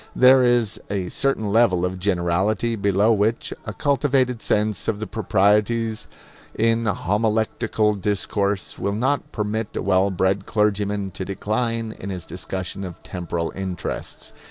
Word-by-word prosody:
There 130 +1 +7
is 120 -4 +2
a 95 -3 -2
certain 120 -7 0
level 95 -6 +3
of 90 0 -3
generality 95 +4 +1
below 100 +2 +3
which 110 +2 0
a 105 - -5
cultivated 130 -1 +1
sense 105 -2 0
of 105 -2 0
the 110 - -3
proprieties 110 +2 +1 0.5
in 115 0 +2
homiletical 110 +2 +1
discourse 100 0 -2
will 100 0 -1
not 130 +5 0
permit 110 0 -3
a - - -2
well 95 0 +3
bred 95 +1 0
clergyman 105 -2 0
to 95 - -5
decline 110 +4 -2
in 100 - -8
his 90 -3 -5
discussion 95 +2 -5
of 90 -3 -8
temporal 85 -2 -4
interests. 95 -3 -5
105 Hz, 135 wpm, -23 LUFS, 95-115 Hz, 0.5 s, There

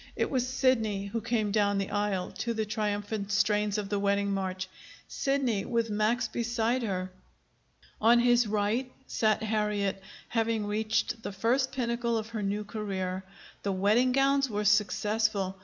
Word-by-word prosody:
It - - -1
was 255 -2 +1
Sidney 230 -6 +1
who 220 +3 -3
came 225 -3 0
down 205 -1 +2
the 195 0 -2
aisle 205 -3 -1
to 235 -1 -1
the 220 0 0
triumphant 205 -1 -2
strains 210 0 +2
of 205 -2 -3
the 205 - 0
wedding 200 0 +1
march, 190 -1 -2 0.4
Sidney 265 -7 0
with 230 -2 -1
Max 220 +3 +1
beside 235 +2 0
her! 185 -4 -2 0.9
On 235 +2 +6
his 240 -1 +4
right 215 +5 0
sat 215 -3 +1
Harriet, 210 -3 0 0.3
having 225 -2 0
reached 220 +2 -1
the - - -5
first 245 +7 +1
pinnacle 235 -2 -1
of 220 0 -4
her 225 -2 -4
new 205 +1 -1
career. 195 -3 -3 0.4
The 200 - -1
wedding 215 +7 +3
gowns 275 +1 +3
were 210 -1 -2
successful. 210 -1 +1
215 Hz, 155 wpm, -29 LUFS, 200-235 Hz, 0.9 s, On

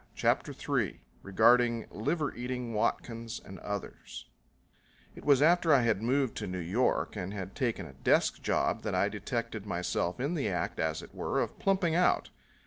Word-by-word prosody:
CHAPTER - - +1
III - - -2 0.2
Regarding 115 +3 +4
Liver 145 +7 -1
Eating 125 -1 -4
Watkins 115 +1 -2
and 95 - -11
Others 100 -1 -6 0.9
It - - -12
was 145 -1 +5
after 170 0 +4
I 140 -3 +6
had 110 -4 +1
moved 130 +2 +1
to - - -3
New 90 0 -4
York 95 +9 0
and 95 +3 -4
had 95 -1 -6
taken 115 -8 -1
a 70 - -11
desk 65 - +2
job - - 0
that - - -2
I 100 - +2
detected 105 0 -4
myself 90 +1 -1
in 140 +6 -1
the 140 -10 0
act, 90 - -2
as 80 -1 -1
it - - -13
were, - - -1
of - - -3
plumping 190 -4 +2
out. 180 +2 +2
115 Hz, 170 wpm, -30 LUFS, 100-135 Hz, 0.9 s, I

